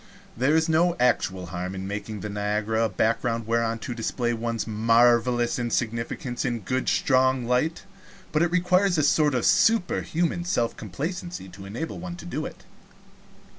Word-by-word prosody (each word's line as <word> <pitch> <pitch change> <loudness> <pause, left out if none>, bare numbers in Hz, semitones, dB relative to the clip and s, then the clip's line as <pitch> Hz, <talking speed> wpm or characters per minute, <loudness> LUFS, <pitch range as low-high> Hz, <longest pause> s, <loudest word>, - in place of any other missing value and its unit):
There 130 +6 +2
is 160 +1 +3
no 170 +2 +3
actual 95 -7 +1
harm 90 +2 -4
in 95 0 -5
making 105 +1 -5
Niagara 105 +2 -1
a - - -1
background 115 +3 0
whereon 115 0 0
to 125 - -3
display 120 +1 -1
one's 115 0 -2
marvelous 120 +2 +3
insignificance 120 +1 -2
in 125 -2 0
a - - -5
good 130 +7 -1
strong 130 -1 +2
light, 125 +7 0 0.5
but 155 - +1
it 170 - +3
requires 180 +1 +2
a 155 - +2
sort 145 -1 +3
of 125 - 0
superhuman 175 -5 +2
self 120 -9 0
complacency 160 - -5
to 95 +2 -11
enable 120 +11 -5
one 175 0 -6
to 175 - -11
do 155 -3 -3
it. - - -13
120 Hz, 160 wpm, -25 LUFS, 110-155 Hz, 0.5 s, is